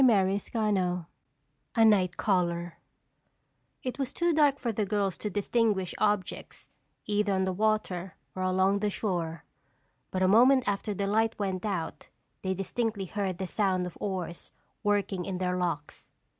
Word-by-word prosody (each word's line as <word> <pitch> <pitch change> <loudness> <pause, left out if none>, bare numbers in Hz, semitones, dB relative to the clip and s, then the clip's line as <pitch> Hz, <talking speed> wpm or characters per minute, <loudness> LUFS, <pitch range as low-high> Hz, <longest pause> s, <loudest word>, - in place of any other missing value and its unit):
CHAPTER 215 -7 +5 0.3
VIII 190 -6 +1 0.7
A 225 - +6
Night 190 -4 +4
Caller 175 -4 0 1.0
It 255 +1 -4
was 270 -2 -1
too 345 -1 +1
dark 295 -3 +4
for 240 -4 -2
the 215 0 -1
girls 200 -2 0
to 210 - -3
distinguish 205 -2 +1
objects 205 -3 -1 0.3
either 205 -1 +1
on 190 - +1
the 190 - -1
water 195 -3 0 0.2
or 185 - -3
along 190 +2 +2
the 210 0 +1
shore, 170 -6 -2 0.6
but 185 0 -1
a - - +5
moment 250 +6 +6
after 200 +1 -1
the 200 - -1
light 220 +3 +1
went 195 -1 -2
out 175 -6 -3 0.3
they 190 0 -1
distinctly 200 +1 -2
heard 190 -1 -2
the 190 - -3
sound 185 -1 +1
of 180 - -7
oars 185 -4 -4 0.3
working 205 -3 0
in 185 0 -3
their 180 0 0
locks. 170 -5 -3
195 Hz, 155 wpm, -29 LUFS, 185-215 Hz, 1.0 s, A